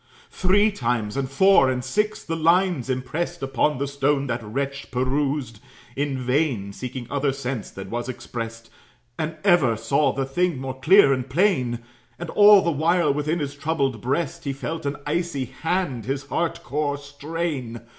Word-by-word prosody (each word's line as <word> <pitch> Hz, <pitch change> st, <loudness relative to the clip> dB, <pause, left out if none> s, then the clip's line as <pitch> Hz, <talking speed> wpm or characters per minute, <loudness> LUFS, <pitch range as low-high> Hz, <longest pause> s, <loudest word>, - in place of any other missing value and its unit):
Three 205 Hz, +3 st, +3 dB
times, 120 Hz, -, -1 dB
and 135 Hz, -1 st, -2 dB
four, 140 Hz, -1 st, +5 dB
and 125 Hz, -1 st, -1 dB
six, 210 Hz, +9 st, -1 dB
the 165 Hz, -, -3 dB
lines 165 Hz, -4 st, +2 dB
impressed 145 Hz, +6 st, -3 dB
Upon 135 Hz, +2 st, +1 dB
the 140 Hz, -, -1 dB
stone 140 Hz, 0 st, 0 dB
that 120 Hz, -2 st, -2 dB
wretch 140 Hz, +6 st, -4 dB
perused, 130 Hz, -2 st, -1 dB, 0.4 s
in 140 Hz, -1 st, -1 dB
vain 125 Hz, -6 st, 0 dB
Seeking 125 Hz, +2 st, -6 dB
another 140 Hz, +2 st, 0 dB
sense 130 Hz, -4 st, -4 dB
than 95 Hz, 0 st, -9 dB
was 120 Hz, +2 st, -3 dB
expressed, 115 Hz, -2 st, -6 dB, 0.5 s
And 160 Hz, 0 st, -3 dB
ever 165 Hz, -, +4 dB
saw 135 Hz, +5 st, +2 dB
the 135 Hz, 0 st, -2 dB
thing 175 Hz, +3 st, 0 dB
more 130 Hz, 0 st, -5 dB
clear 155 Hz, 0 st, +6 dB
and 130 Hz, 0 st, -3 dB
plain; 130 Hz, -, +1 dB, 0.4 s
And -, -, -6 dB
all 205 Hz, -1 st, +7 dB
the 170 Hz, -, +1 dB
while, 160 Hz, 0 st, +2 dB
within 150 Hz, +3 st, -1 dB
his 145 Hz, -4 st, -3 dB
troubled 140 Hz, -6 st, -1 dB
breast, 165 Hz, +6 st, -2 dB
He 140 Hz, -, -1 dB
felt 145 Hz, +3 st, -4 dB
an 140 Hz, -, -2 dB
icy 150 Hz, -3 st, -1 dB
hand 160 Hz, -, -2 dB
his 135 Hz, +1 st, -3 dB
heart 170 Hz, -1 st, -2 dB
core 145 Hz, +1 st, -1 dB
strain. 145 Hz, -4 st, -4 dB
140 Hz, 165 wpm, -24 LUFS, 130-165 Hz, 0.5 s, all